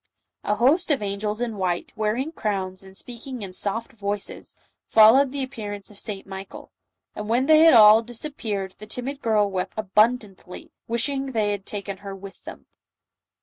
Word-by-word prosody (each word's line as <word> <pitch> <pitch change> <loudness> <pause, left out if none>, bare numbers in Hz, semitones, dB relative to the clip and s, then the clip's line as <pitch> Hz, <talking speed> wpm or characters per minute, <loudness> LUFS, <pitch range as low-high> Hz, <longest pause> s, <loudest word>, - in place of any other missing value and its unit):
A 210 - 0
host 290 - +3
of 275 -7 +1
angels 210 +2 -3
in 230 -3 -2
white, 180 -2 -2
wearing 220 +8 -1
crowns, 190 - -3
and 190 0 -12
speaking 245 0 -7
in 190 -2 -7
soft 210 +4 -3
voices, 205 -2 -5 0.3
followed 240 +5 +6
the 280 -1 -2
ap 260 - -6
pearance 205 -5 -7
of 200 - -14
St. 205 -3 -5
Michael; 195 0 -9 0.4
and 210 0 -6
when 245 +3 +2
they 310 +1 +6
had 325 -3 +7
all 215 0 +8
disap 240 +5 -7
peared 200 -6 -3
the 215 - -10
timid 265 +5 -5
girl 210 -3 +2
wept 185 -1 -3
abundantly, 210 -2 0 0.2
wishing 270 +3 -1
they 215 -2 +1
had 200 -1 -5
taken 200 -1 -5
her 195 0 -8
with 195 0 -12
them. - - -10
215 Hz, 175 wpm, -24 LUFS, 200-245 Hz, 0.4 s, all